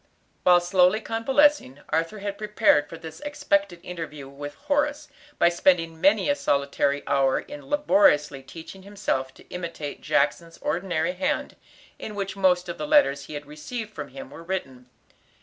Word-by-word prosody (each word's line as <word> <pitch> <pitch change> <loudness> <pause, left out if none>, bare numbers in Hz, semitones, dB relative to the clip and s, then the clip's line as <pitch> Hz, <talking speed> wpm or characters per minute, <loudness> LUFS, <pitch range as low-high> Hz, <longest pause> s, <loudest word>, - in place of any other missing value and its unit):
While 180 -1 +6
slowly 180 +3 +3
convalescing, 230 - +2
Arthur 165 +6 -1
had 200 0 -5
prepared 210 -8 +3
for 165 - -8
this 160 -1 -10
expected 200 -12 -1
interview 155 -5 -7
with 145 +1 -8
Horace, 295 +1 -1 0.3
by 170 - +5
spending 165 -2 +1
many 195 +2 +4
a 285 - +4
solitary 140 - 0
hour 135 -1 +2
in 290 -1 -10
laboriously 290 - +3
teaching 165 +7 -11
himself 190 -10 -2
to - - -18
imitate 170 -5 -6
Jackson's 165 +4 0
ordinary 175 -2 -1
hand, 185 - -2 0.4
in 210 - -7
which 195 -1 -3
most 185 -2 +2
of 170 - -6
the 300 - -3
letters 285 - +4
he 150 - -8
had 145 0 -6
received 215 +9 -7
from - - -6
him 270 0 -10
were - - -10
written. 135 -9 -5
180 Hz, 155 wpm, -25 LUFS, 150-215 Hz, 0.4 s, While